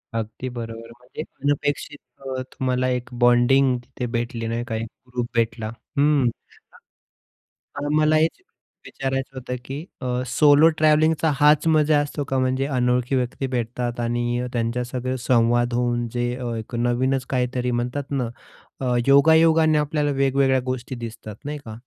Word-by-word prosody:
अगदी 115 Hz, +3 st, -4 dB
बरोबर. 115 Hz, -1 st, -7 dB
म्हणजे 125 Hz, +5 st, -8 dB, 0.2 s
अनपेक्षित 145 Hz, +1 st, -1 dB, 0.3 s
अ, 130 Hz, -1 st, -4 dB
तुम्हाला 130 Hz, 0 st, -1 dB
एक 125 Hz, 0 st, -2 dB
बॉन्डिंग 125 Hz, +2 st, +4 dB
तिथे 125 Hz, 0 st, -6 dB
भेटली 115 Hz, -1 st, -2 dB
नाही 115 Hz, +1 st, -2 dB
का. 110 Hz, -, -3 dB
एक 110 Hz, +1 st, -3 dB, 0.2 s
ग्रुप 125 Hz, -1 st, -3 dB
भेटला. 115 Hz, -1 st, 0 dB, 0.3 s
हं. 140 Hz, -3 st, +3 dB, 1.5 s
अ, 145 Hz, 0 st, -3 dB
मला 155 Hz, 0 st, +3 dB
हेच 160 Hz, -, +1 dB, 0.4 s
विचारायचं 135 Hz, 0 st, -4 dB
होतं, 125 Hz, 0 st, -4 dB
की 145 Hz, +5 st, -6 dB, 0.4 s
सोलो 150 Hz, +1 st, +5 dB
ट्रॅव्हलिंगचा 155 Hz, +1 st, +3 dB
हाच 150 Hz, +2 st, +5 dB
मजा 155 Hz, -1 st, +4 dB
असतो 145 Hz, 0 st, -3 dB
का? 135 Hz, -, -1 dB
म्हणजे 130 Hz, +1 st, +1 dB
अनोळखी 125 Hz, +1 st, +1 dB
व्यक्ती 130 Hz, +1 st, -1 dB
भेटतात 120 Hz, -1 st, -3 dB
आणि 120 Hz, +1 st, -1 dB
त्यांच्यासंगं 125 Hz, +2 st, -2 dB
संवाद 120 Hz, 0 st, +2 dB
होऊन 120 Hz, -1 st, 0 dB
जे 120 Hz, 0 st, 0 dB, 0.3 s
एक 110 Hz, +2 st, -7 dB
अ, -, -, -2 dB
नवीनच 125 Hz, +2 st, 0 dB
काहीतरी 125 Hz, -1 st, -1 dB
म्हणतात 125 Hz, +4 st, -3 dB
ना, 130 Hz, -4 st, -1 dB, 0.5 s
अ, 125 Hz, -1 st, +1 dB
योगायोगाने 160 Hz, +2 st, +5 dB
आपल्याला 150 Hz, 0 st, 0 dB
वेगवेगळ्या 135 Hz, -1 st, +2 dB
गोष्टी 130 Hz, 0 st, -4 dB
दिसतात, 110 Hz, -2 st, -9 dB
नाही 150 Hz, +1 st, -3 dB
का? 110 Hz, -, -7 dB
130 Hz, 140 wpm, -23 LUFS, 120-145 Hz, 1.5 s, सोलो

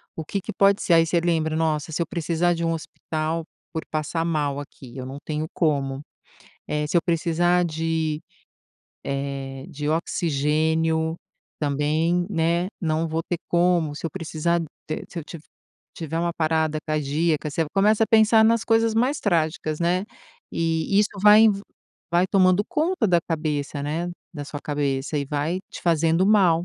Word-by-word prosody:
o 160 Hz, -, -4 dB
que 195 Hz, +5 st, -3 dB
que -, -, -6 dB
pode 200 Hz, +1 st, +3 dB
ser, 175 Hz, -, +3 dB
aí 165 Hz, 0 st, +6 dB
você 170 Hz, +1 st, +1 dB
lembra: 160 Hz, -2 st, 0 dB
"Nossa, 160 Hz, -1 st, 0 dB
se 170 Hz, -, -1 dB
eu 170 Hz, -, -1 dB
precisar 170 Hz, +1 st, 0 dB
de 170 Hz, 0 st, -3 dB
um 165 Hz, -, +1 dB
hospital 160 Hz, 0 st, -3 dB, 0.3 s
por 160 Hz, -, -3 dB
passar 155 Hz, +2 st, -2 dB
mal 145 Hz, -4 st, -1 dB
aqui, 135 Hz, -3 st, -11 dB
eu 130 Hz, -, -5 dB
não 135 Hz, +2 st, -7 dB
tenho 155 Hz, 0 st, -2 dB
como. 140 Hz, -4 st, 0 dB, 0.7 s
Eh, 150 Hz, 0 st, -1 dB
se -, -, -4 dB
eu -, -, +3 dB
precisar 175 Hz, +1 st, +2 dB
de, 160 Hz, -1 st, -1 dB, 0.8 s
eh, 135 Hz, -1 st, -4 dB
de 145 Hz, +1 st, -4 dB
oxigênio, 160 Hz, +1 st, 0 dB, 0.4 s
também, 155 Hz, +4 st, +1 dB
né, 170 Hz, 0 st, +1 dB
não 160 Hz, -1 st, 0 dB
vou 160 Hz, +1 st, -1 dB
ter 175 Hz, -, -3 dB
como, 170 Hz, -3 st, +2 dB
se -, -, -9 dB
eu -, -, -5 dB
precisar 170 Hz, -1 st, -1 dB
de 165 Hz, -, -4 dB, 0.4 s
se 175 Hz, -, -7 dB
eu 160 Hz, -, -5 dB
tiv 165 Hz, 0 st, -9 dB, 0.5 s
tiver 165 Hz, 0 st, -4 dB
uma 170 Hz, 0 st, 0 dB
parada 160 Hz, -1 st, +1 dB
cardíaca". 155 Hz, +1 st, 0 dB
Você 165 Hz, +3 st, 0 dB
começa 210 Hz, +3 st, +4 dB
a -, -, -10 dB
pensar 220 Hz, 0 st, +5 dB
nas 230 Hz, 0 st, +3 dB
coisas 225 Hz, -1 st, +2 dB
mais 255 Hz, +6 st, +2 dB
trágicas, 160 Hz, -4 st, 0 dB
né, 180 Hz, +3 st, +1 dB, 0.5 s
e 165 Hz, +4 st, +1 dB
isso 210 Hz, -, +4 dB
vai 210 Hz, +2 st, +8 dB, 0.6 s
vai 175 Hz, +2 st, +3 dB
tomando 185 Hz, 0 st, +4 dB
conta 315 Hz, -5 st, +1 dB
da 175 Hz, -, +4 dB
cabeça, 150 Hz, -3 st, -2 dB
né, 165 Hz, +4 st, -2 dB, 0.2 s
da 145 Hz, -1 st, -5 dB
sua 145 Hz, 0 st, -7 dB
cabeça, 145 Hz, 0 st, -2 dB
e 140 Hz, -, -1 dB
vai 150 Hz, +6 st, -2 dB
te -, -, -8 dB
fazendo 165 Hz, +1 st, +3 dB
mal. 180 Hz, -5 st, +4 dB
165 Hz, 165 wpm, -24 LUFS, 150-175 Hz, 0.8 s, vai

